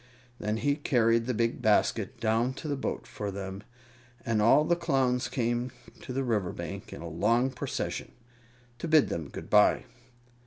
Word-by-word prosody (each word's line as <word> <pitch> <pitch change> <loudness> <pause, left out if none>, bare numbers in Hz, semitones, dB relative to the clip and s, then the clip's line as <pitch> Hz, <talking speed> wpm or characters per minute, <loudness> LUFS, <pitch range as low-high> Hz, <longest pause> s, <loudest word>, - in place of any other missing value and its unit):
Then 105 +1 -1
he 145 +4 +1
carried 115 -5 +2
the 125 - +1
big 115 +2 0
basket 110 +1 +2
down 115 +3 +1
to 155 - -7
the 145 - 0
boat 135 - -3
for 105 -1 -5
them, 95 0 -6 0.6
and 110 -2 +1
all 135 +7 +6
the 175 - +3
Clowns 135 -7 +1
came 120 0 -1 0.3
to - - -7
the 135 +2 -1
river 105 -7 0
bank - - -7
in - - -8
a - - -5
long 115 +11 +2
procession, 125 - -4 0.7
to - - -3
bid 155 -2 +5
them 80 -4 -4
good - - -8
bye. - - +5
120 Hz, 170 wpm, -29 LUFS, 110-135 Hz, 0.7 s, all